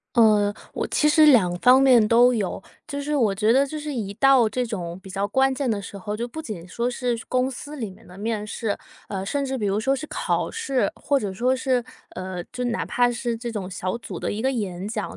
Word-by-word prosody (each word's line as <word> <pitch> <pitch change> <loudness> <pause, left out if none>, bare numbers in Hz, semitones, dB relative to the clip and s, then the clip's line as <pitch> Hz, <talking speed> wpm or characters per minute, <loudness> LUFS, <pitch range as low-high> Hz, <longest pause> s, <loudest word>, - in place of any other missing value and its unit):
呃， 210 -3 +5 0.2
我 - - -2
其 300 - +2
实 305 0 +6
两 200 -11 +5
方 255 +5 +6
面 250 -5 +6
都 245 +2 +5
有。 200 -2 -2 0.3
就 285 0 -4
是 295 +1 -2
我 225 -8 +3
觉 210 +4 +2
得 270 +2 +4
就 305 +2 -5
是 295 -1 -5
一 205 -5 -3
到 265 -2 +5
这 250 +3 -2
种 180 -5 -5
比 190 - -13
较 195 +2 -2
关 265 0 +2
键 260 -2 -1
的 205 -2 -1
时 200 - -9
候， 205 +2 -4
就 235 +2 -3
不 315 +6 -7
仅 190 - -7
说 235 +6 -2
是 245 -1 -1
公 255 0 +1
司 290 +3 -8
里 225 -6 -4
面 190 - -15
的 180 +2 -14
面 215 0 -2
试， 210 -1 -3 0.3
呃， 195 -2 -4
甚 280 +7 -1
至 265 0 -2
比 215 - -3
如 200 +1 +1
说 265 +5 +1
是 275 +3 -5
考 - - -1
试， 275 - 0
或 285 - 0
者 200 -2 -3
说 250 +6 +1
是， 255 -1 +1 0.4
呃， 185 -1 -4
就 250 0 -3
哪 240 -1 -1
怕 245 0 +2
是 240 -1 -2
这 235 0 -5
种 195 -3 -4
小 185 +3 -3
组 - - -7
的 - - -2
一 215 +3 -4
个 265 - +2
演 200 -6 -3
讲， 215 -2 -4
235 Hz, 260 characters per minute, -24 LUFS, 205-260 Hz, 0.4 s, 实